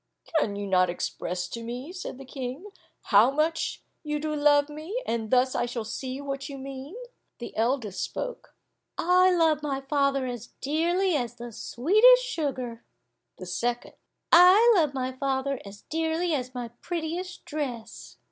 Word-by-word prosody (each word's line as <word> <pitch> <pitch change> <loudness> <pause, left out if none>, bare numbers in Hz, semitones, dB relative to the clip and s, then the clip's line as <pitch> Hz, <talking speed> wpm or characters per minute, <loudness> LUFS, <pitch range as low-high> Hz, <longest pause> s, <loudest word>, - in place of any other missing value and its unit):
"Can 205 -8 -1
you 205 0 -4
not 185 -2 +3
express 180 +1 -3
to 230 - -6
me," 250 +8 -6
said 365 -8 -6
the 270 - -10
King, 265 +9 -6 0.4
"how 210 +5 +8
much 310 +4 -1 0.2
you 300 -1 -2
do 305 0 -2
love 290 -1 +4
me, 310 +10 -5
and 225 -2 -2
thus 255 +1 +3
I 240 - 0
shall 240 -2 -4
see 255 +4 -5
what 275 0 -5
you 280 - -7
mean?" 270 +5 -8 0.4
The 240 - -8
eldest 225 -4 0
spoke. - - -5 0.4
"I 365 +1 +4
love 325 -4 +3
my 280 -2 -2
father 275 -1 +1
as 245 -2 -5
dearly 340 +6 +1
as 240 -4 -2
the 240 0 -8
sweetest 430 - +5
sugar." 255 - -3 0.5
The 185 - -8
second, 235 +8 -2 0.4
"I 370 +7 +8
love 305 -6 +2
my 260 -1 -1
father 270 0 -2
as 200 +1 -11
dearly 325 +2 -1
as 255 -3 -3
my 245 -1 -4
prettiest 350 +2 -4
dress." 250 -7 -6
275 Hz, 155 wpm, -27 LUFS, 240-320 Hz, 0.5 s, how